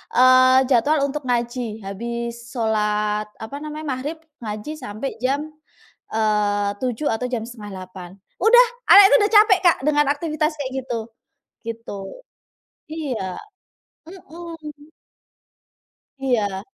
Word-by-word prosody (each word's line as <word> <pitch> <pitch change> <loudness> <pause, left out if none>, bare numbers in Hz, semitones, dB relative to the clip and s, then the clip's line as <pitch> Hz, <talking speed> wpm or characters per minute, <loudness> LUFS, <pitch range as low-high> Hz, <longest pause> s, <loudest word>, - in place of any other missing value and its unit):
eee, 255 +1 +6
jadwal 280 +5 +3
untuk 295 +2 -5
ngaji, 240 -2 -2
habis 235 +3 -5
sholat 210 -3 0 0.2
apa 220 +5 -7
namanya, 305 +1 -6
maghrib, 285 +6 -5 0.3
ngaji 210 +5 -5
sampai 215 +4 -5
jam, 275 +3 +1 0.7
eee, 210 -2 +1
07.00 255 +3 -1
atau 225 +3 -2
jam 230 -3 -2
07.30 190 -6 -9 0.3
udah, 480 +4 +6 0.2
anak 405 - +11
itu - - +7
udah 410 +1 +1
capek 420 -3 +6
Kak 345 - +5
dengan 295 -1 +3
aktivitas 305 +1 -1
kayak 265 -2 -4
gitu, 240 -3 -3 0.7
gitu. 230 -3 -6 0.9
Iya. 255 - -4 0.7
Mhm. 325 -4 -11 1.3
Iya. 210 -7 -1
245 Hz, 110 wpm, -22 LUFS, 215-300 Hz, 1.3 s, anak